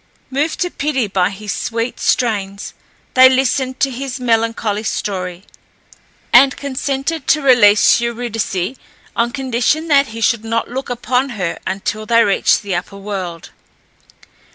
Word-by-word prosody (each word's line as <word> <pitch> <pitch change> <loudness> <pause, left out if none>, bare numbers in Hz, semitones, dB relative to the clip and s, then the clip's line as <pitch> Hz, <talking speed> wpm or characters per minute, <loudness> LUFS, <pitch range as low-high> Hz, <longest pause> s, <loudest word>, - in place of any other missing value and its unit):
Moved 290 +4 -1
to 355 -1 0
pity 280 -4 -1
by 190 -2 +1
his 200 +1 -5
sweet 230 +1 -3
strains, 200 -4 -1 0.4
they 260 0 +8
listened 260 0 0
to 270 - +2
his 260 +1 -5
melancholy 225 -3 0
story, 185 -4 -4 0.9
and 265 +2 +6
consented 280 +2 -3
to 305 - +3
release 230 -4 +5
Eurydice 235 -3 -3 0.4
on 235 +1 +1
condition 265 +5 -1
that 280 -1 +4
he 225 +1 -8
should 225 0 +1
not 230 0 -1
look 265 +1 -4
upon 250 +2 -1
her 180 -3 -3
until 215 +2 -3
they 230 0 +5
reached 200 0 +2
the 200 -2 -3
upper 180 +3 -4
world. 190 -4 -6
235 Hz, 135 wpm, -17 LUFS, 205-265 Hz, 0.9 s, they